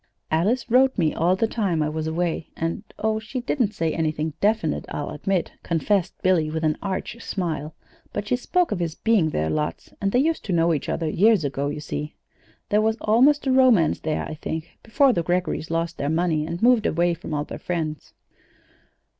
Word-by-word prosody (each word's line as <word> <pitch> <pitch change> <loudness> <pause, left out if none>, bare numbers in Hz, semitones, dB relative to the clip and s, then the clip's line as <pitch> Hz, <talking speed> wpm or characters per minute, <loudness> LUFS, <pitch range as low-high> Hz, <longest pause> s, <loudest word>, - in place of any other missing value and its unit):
Alice 210 +10 +1
wrote 260 +2 +4
me 160 -5 +2
all 175 +3 +2
the 210 - +1
time 195 -8 0
I 150 - -1
was 155 0 -3
away, 165 0 -2
and 165 +4 -2
oh, 220 0 0
she 225 +4 -5
didn't 240 -4 -1
say 165 -3 0
anything 155 -1 -1
definite, 210 -6 +1
I'll 145 - -4
admit," 180 +4 -1
confessed 180 +3 0
Billy, 180 -5 +3
with 160 +1 -3
an 155 -1 +2
arch 200 +4 -4
smile; 160 -7 -3 0.4
"but 205 - -4
she 250 - +2
spoke 355 +7 0
of 205 - -1
his 170 -2 -2
being 215 -8 +2
there 80 - -1
lots, 150 0 -3
and 200 -1 +1
they 245 - +2
used 315 +5 +1
to 195 - -1
know 165 0 +3
each 145 - -3
other 165 - -1
years 200 +1 +3
ago, 140 0 -2
you 145 +1 -4
see. 150 +1 -5 0.5
There 210 +1 +3
was 220 +1 +1
almost 265 +8 +4
a 265 - +2
romance 255 -11 +4
there, 155 -1 -2
I - - -6
think, 160 +1 -6
before 265 +3 +3
the 170 - +1
Greggorys 175 -1 -1
lost 165 +1 -2
their 140 - -1
money 160 -1 +1
and 170 +5 -4
moved 240 -2 +5
away 170 +1 +2
from 165 -2 -5
all 145 - -1
their - - -8
friends." 160 -3 -4
175 Hz, 200 wpm, -24 LUFS, 155-220 Hz, 0.5 s, moved